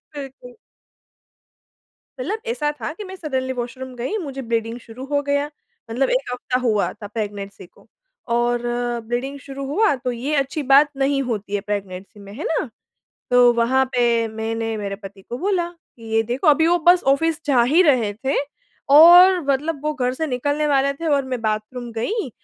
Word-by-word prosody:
बिल्कुल। 265 -3 -9 1.7
मतलब 440 -2 -2
ऐसा 300 -11 -1
था - - -3
कि 415 +5 -9
मैं 380 0 -8
सडनली 260 -6 -3
वॉशरूम 255 +1 -6
गई 255 - -3
मुझे 275 -6 -6
ब्लीडिंग 230 +1 -1
शुरू 240 +3 -10
हो 285 0 0
गया, 285 +1 -1 0.4
मतलब 255 +3 0
1 255 0 0
हफ्ता 250 0 -2
हुआ 220 -5 +1
था 205 - -10
प्रेग्नेंसी 205 -3 -6
को। - - -24 0.5
और 240 0 +1 0.4
ब्लीडिंग 260 +4 -3
शुरू 275 +1 -7
हुआ 370 +7 +2
तो 250 - 0
ये 265 +6 -3
अच्छी 275 +2 -1
बात 290 +2 +7
नहीं 275 0 +1
होती 215 -5 -4
है 205 - 0
प्रेग्नेंसी 200 -1 -6
में। 200 0 -11
है 295 - -6
ना? 310 -4 -1 0.6
तो 245 -1 +6
वहाँ 245 +3 +2
पे 235 -2 +2
मैंने 225 0 -3
मेरे 200 -1 -4
पति 195 -1 -12
को 240 - -5
बोला 360 -1 0
कि 315 -9 -20
ये 225 - +4
देखो 240 +6 -3
अभी 310 +2 +5
वो 350 +1 +3
बस 355 0 +6
ऑफ़िस 325 +2 0
जा 255 -4 +4
ही 300 +9 +4
रहे 250 - +2
थे 270 - +1 0.6
और 355 +3 +9
मतलब 285 +2 0
वो 305 - 0
घर 250 -3 -1
से 320 +3 -2
निकलने 285 +3 -1
वाले 280 -1 +2
थे। 330 +4 -6
और 285 -3 +2
मैं 255 -2 -4
बाथरूम 220 +3 -3
गई, 265 - -2
260 Hz, 180 wpm, -21 LUFS, 230-295 Hz, 1.7 s, और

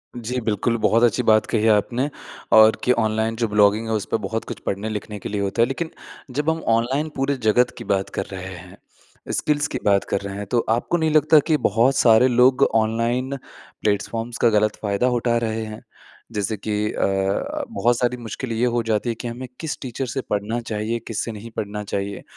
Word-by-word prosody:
जी 120 +2 -3
बिल्कुल, 115 +2 0
बहुत 115 +2 +3
अच्छी 120 +1 +3
बात 110 -1 +4
कही 110 - 0
है 110 - +4
आपने 120 +6 +1 0.4
और 110 0 +8
कि 125 - +3
ऑनलाइन 110 -1 +1
जो 115 0 0
ब्लॉगिंग 105 +1 +3
है, 110 - -1
उस 105 - -1
पे - - +3
बहुत - - -3
कुछ - - -7
पढ़ने-लिखने 105 +1 -4
के - - -6
लिए 105 -1 -2
होता 100 +3 0
है। 115 - +5
लेकिन 160 +5 -4 0.4
जब 150 +4 0
हम 160 0 0 0.2
ऑनलाइन 135 +7 -1
पूरे 135 +1 0
जगत 125 +3 +3
की - - -7
बात 95 0 -1
कर 95 - -2
रहे 95 0 -6
हैं, 90 - -12 0.5
स्किल्स 145 0 0
की - - -4
बात 100 -1 +4
कर 100 - 0
रहे 100 0 -6
हैं, 105 - -4
तो 120 +4 +1
आपको 120 +9 +1
नहीं 160 -2 +1
लगता 155 +1 +5
कि 155 - +3
बहुत 120 +3 +2
सारे 115 +1 +5
लोग 125 +1 +4
ऑनलाइन 115 +4 0 0.5
प्लेटफ़ॉर्म्स 115 +3 -1
का 120 - +4
गलत 105 0 +2
फ़ायदा 105 +4 +1
उठा 120 0 +1
रहे 110 -1 -2
हैं? 110 0 -8 0.5
जैसे 105 0 -1
कि 105 +2 -5 0.2
अ, 100 - -1
बहुत 120 - +1
सारी 125 0 0
मुश्किल 120 +1 -6
ये 115 +2 +1
हो 120 - +2
जाती 110 +1 0
है 115 - -1
कि 120 - -6
हमें 125 +2 -6
किस 160 -3 -4
टीचर 130 0 -4
से 130 +3 -3
पढ़ना 105 +3 -1
चाहिए, 110 +1 -3
किस 115 -1 -3
से 115 - -4
नहीं 110 +2 -9
पढ़ना 105 0 -3
चाहिए। 100 0 -4
115 Hz, 210 wpm, -22 LUFS, 105-125 Hz, 0.5 s, और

